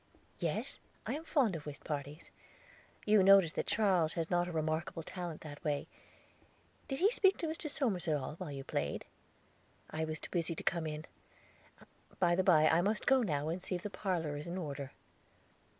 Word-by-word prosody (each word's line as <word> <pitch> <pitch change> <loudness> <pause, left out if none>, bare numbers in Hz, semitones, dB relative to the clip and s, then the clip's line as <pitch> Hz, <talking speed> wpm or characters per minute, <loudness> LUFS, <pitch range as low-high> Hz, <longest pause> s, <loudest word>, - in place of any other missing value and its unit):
"Yes, - - -2 0.3
I - - -1
am 310 - -4
fond 260 - +2
of 150 -2 -7
whist 140 -2 -7
parties. 145 +1 -5 0.7
You 210 -1 +6
noticed 190 -4 +7
that - - -1
Charles 185 -7 +3
has 165 0 -3
not 175 0 +2
a - - -4
remarkable 160 +1 -2
talent 175 -2 -6
that 145 0 -9
way. 145 -3 0 1.0
Did 270 - -2
he 390 +8 +4
speak 390 -5 +4
to - - -2
Mr. 315 -1 -4
Somers 225 - 0
at 155 - +3
all, 140 +1 -5
while 175 -4 -5
you 135 -1 -5
played? 70 - -2 0.9
I 160 0 -1
was 155 0 -4
too - - -9
busy 170 -1 0
to - - -6
come 165 -2 0
in. 155 +1 -5 1.1
By 175 -1 +3
the 180 - +3
by, 160 -5 +6
I 160 +2 +4
must 210 +4 0
go 265 -1 +5
now, 150 -8 0
and 175 +3 -2
see 185 - -2
if 175 - -5
the 210 - -4
parlor 170 -8 -1
is 145 +2 -6
in 175 +2 -4
order." 140 -5 -4
170 Hz, 195 wpm, -34 LUFS, 155-195 Hz, 1.1 s, noticed